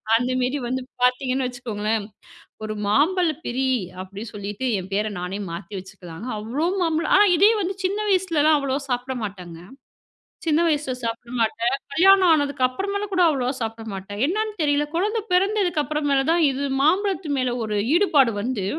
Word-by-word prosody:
அந்த 245 +2 +1
மாரி 255 +3 0
வந்து 260 +2 -2 0.2
பாத்தீங்கன்னு 255 +1 +1
வச்சுக்கோங்களேன். 220 -4 -3 0.6
ஒரு 215 0 -3
மாம்பழ 320 - +2
பிரி 260 +2 -1 0.4
அப்படி 195 +2 -9
சொல்லிட்டு 205 +4 -5
என் 185 +1 -8
பேர 210 +2 0
நானே 180 +3 -4
மாத்தி 170 +4 -7
வச்சுக்கலா. 185 -3 -11 0.2
அவ்ளோ 240 +10 -2 0.2
மாம்பழம் 330 0 0
ஆனா 410 - +7
இதே 405 +5 +6
வந்து 380 +2 -1
சின்ன 400 +3 0
வயசுலலாம் 330 -5 +3
அவ்வளோவா 275 0 -1
சாப்பிட 250 +1 -2
மாட்டேங்க. 180 -5 -7 0.9
சின்ன 315 0 +3
வயசுல 295 -4 0
சாப்பிட 230 +1 -4
மாட்டேன், 230 +1 +1 0.2
கல்யாணம் 380 +1 +6
ஆனதுக்கு 285 -4 +1
அப்புறமாலே 400 +10 -3
கூட 365 -1 +3
அவ்வளோவா 260 -4 0
சாப்பிட 225 0 -4
மாட்டேன். 195 +2 -7
என்னான்னு 430 +6 -1
தெரியல 290 0 +2
கொழந்தை 420 +6 0
பிறந்ததுக்கு 370 -3 +2
அப்புறமேல 290 -2 0
தான், 340 0 +3
இது 275 +1 -2 0.2
மாம்பழத்து 375 0 +1
மேல 255 -2 0
ஒரு 210 -1 -2 0.2
ஈடுபாடு 295 - +4
வந்து, 225 -2 -2
265 Hz, 155 wpm, -23 LUFS, 225-335 Hz, 0.9 s, ஆனா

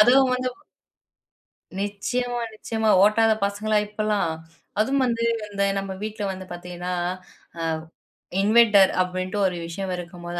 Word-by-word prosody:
அதுவும் 260 +4 +6
வந்து 255 0 -1 1.3
நிச்சியமா, 240 +5 -2
நிச்சியமா. 220 0 -1
ஓட்டாத 220 +1 +5
பசங்களா 210 +2 0
இப்பல்லாம். 210 -4 0 0.5
அதுவும் 265 +4 +2
வந்து, 230 -1 0 0.6
நம்ம 195 0 -5
வீட்ல 215 -1 -4
வந்து 185 0 -8
பார்த்தீங்கன்னா 180 +1 -5 0.7
அ - - -3 0.8
இன்வெர்டர் 210 -2 +6
அப்டின்ட்டு 185 +2 -2
ஒரு 180 - -3
விஷயம் 185 +3 -4
இருக்கும்போது, 175 0 -6
210 Hz, 110 wpm, -24 LUFS, 185-225 Hz, 1.3 s, அதுவும்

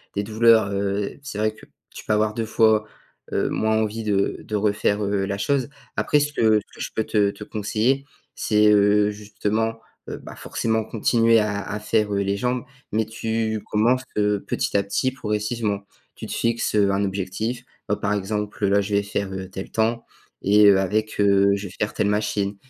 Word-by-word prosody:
des 100 - +1
douleurs, 110 0 +4
heu, 100 0 -2
c'est 120 -7 -6
vrai 110 0 +2
que 110 - -16 0.3
tu - - -9
peux 110 - +1
avoir 105 0 +1
2 115 -1 -1
fois, 110 -1 +3 0.5
heu, - - 0
moins 110 0 +1
envie 110 +1 -1
de 100 -2 0
de 110 - -2
refaire, 105 0 +1
heu, 100 -1 0
la 100 0 -3
chose. 140 0 +1 0.3
Après, 150 - +2
ce 145 0 0
que 110 -6 +3
ce 105 - -17
que - - -8
je - - -4
peux 110 - 0
te 100 -2 +2
te 105 - -10
conseiller 110 +6 0 0.3
c'est, 105 -2 +3
heu, 105 0 +4
justement, 105 +2 -2 0.3
heu, - - -5
bah - - -11
forcément 110 -1 -1
continuer 115 +1 +3
à 105 -1 -1
à 105 0 -4
faire, 105 -1 0
heu, 100 - +1
les 100 0 -1
jambes 125 +2 -1 0.3
mais 110 +1 +1
tu 110 -1 -2
commences 120 +5 +2
que 105 -1 +2
petit 100 - -1
à 100 - +2
petit, 100 +6 0
progressivement. 105 -3 -2 0.4
Tu - - -8
te - - -8
fixes, 115 -2 0
heu, 100 -1 +4
un 100 +1 +1
objectif, 100 +6 -3 0.3
bah, 105 - +2
par 105 0 -1
exemple, 105 0 -2
là 100 +1 +3
je 100 +1 -4
vais 100 - +3
faire, 100 -1 -3
heu, 95 0 -6
tel 95 +1 -7
temps. 115 +1 0 0.4
Et 105 +1 +6
heu, 100 -1 +7
avec, 110 +3 -1
heu, 100 0 +4
je 100 0 -5
vais 90 - -12
faire 105 - 0
telle - - +1
machine. 105 -1 0
105 Hz, 200 wpm, -23 LUFS, 100-110 Hz, 0.5 s, heu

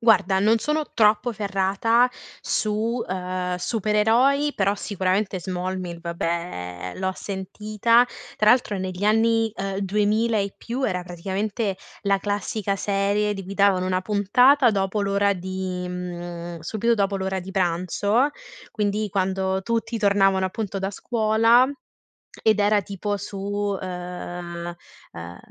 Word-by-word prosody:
Guarda, 205 -5 +4
non 220 +3 +4
sono 300 +4 -1
troppo 220 +2 +3
ferrata 205 +4 +2 0.3
su, 220 +3 -1
ehm, 180 0 -2
supereroi, 225 +9 +2
però 200 0 +1
sicuramente 190 -1 -1
"Smallville" 180 -1 -4
vabbè, 170 - -4
l'ho 190 0 -1
sentita. 210 +5 +1 0.3
Tra 215 0 +5
altro 240 -5 +2
negli 185 +1 -4
anni, 225 +1 +3
ehm, 195 0 -3
2000 210 +3 +1
e 200 -1 -2
più 250 +3 -4
era 180 -6 0
praticamente 195 +4 -3 0.3
la 200 -1 +2
classica 205 0 -2
serie 200 +1 0
di 195 -2 -6
cui 195 +2 -7
davano 195 -2 +3
1 185 0 +1
puntata 240 +7 +4
dopo 195 +1 0
l'ora 200 0 +2
di 185 0 -4
mhmm, 175 -1 -6
subito 220 +7 0
dopo 200 -2 0
l'ora 190 0 -2
di 185 +1 -7
pranzo, 190 - +1 0.4
quindi 210 0 -1
quando 190 0 0
tutti 230 +2 -1
tornavano 195 -2 +3
appunto 200 0 -4
da 195 +1 -1
scuola, 225 +3 +3 0.8
ed 215 -1 +4
era 205 0 +3
tipo 200 +1 -3
su, 200 0 -3
ehm, 175 -1 -6 0.4
ehm, 85 +1 -8
200 Hz, 125 wpm, -24 LUFS, 185-215 Hz, 0.8 s, Tra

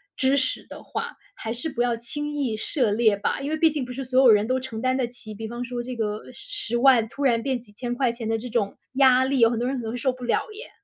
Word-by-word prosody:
知 265 +1 +2
识 260 -1 0
的 - - -10
话， - - -5 0.2
还 225 - -5
是 245 +7 -3
不 240 - -2
要 240 -1 +1
轻 295 +5 -5
易 270 -7 -1
涉 235 0 +1
猎 215 -1 +3
吧。 205 - -1
因 280 - -3
为 315 - 0
毕 320 0 +5
竟 295 -3 -2
不 250 - -7
是 265 +1 -5
所 255 +1 +3
有 255 - +7
人 210 +1 +4
都 255 - +1
承 255 -4 -5
担 255 +1 +1
得 260 -2 +1
起， 235 -2 -9
比 220 +1 -6
方 240 +1 -4
说 240 0 -4
这 250 0 -6
个 210 -1 -2
10 240 -1 -2
万 240 -3 +5
突 285 - -5
然 235 -4 +3
变 265 -2 0
几 225 -3 -18
千 240 +3 -4
块 245 -1 +1
钱 230 -2 -5
的 225 - +1
这 230 +3 -6
种 220 -4 -1 0.2
压 260 -1 +5
力， 270 0 +1
有 230 -1 +6
很 235 -1 -1
多 245 - 0
人 270 - -1
可 240 - -4
能 220 - -3
会 245 - -4
受 255 +1 0
不 250 0 -11
了 240 - +1
耶。 455 +4 -9
245 Hz, 310 characters per minute, -25 LUFS, 230-260 Hz, 0.2 s, 有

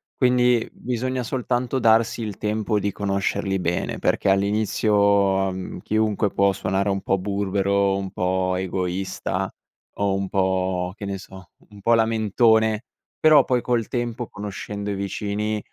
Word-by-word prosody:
quindi 125 -2 +3
bisogna 125 +1 -3
soltanto 125 +1 -1
darsi 115 0 +3
il 105 -3 -5
tempo 105 0 -1
di 100 +1 -1
conoscerli 100 0 -1
bene, 90 -1 -2
perché - - +1
all'inizio, 100 -1 +2
ehm, 95 -1 -6
chiunque 110 -1 +1
può 100 0 +2
suonare 95 +2 -1
un 100 0 -1
po' 95 - +1
burbero, 100 0 0
un 95 -1 -4
po' 95 0 0
egoista 95 0 -2 0.4
o 100 -1 0
un 95 0 -2
po', 95 -1 0
che 105 - -7
ne 100 0 -3
so, 95 -3 -13 0.2
un 105 -1 -14
po' 115 +3 +4
lamentone 110 0 +2 0.4
però 155 -3 +6
poi 125 -2 0
col 120 -3 0
tempo 120 -1 -3
conoscendo 105 0 -5
i - - -1
vicini 105 +2 -2
100 Hz, 140 wpm, -23 LUFS, 95-110 Hz, 0.4 s, però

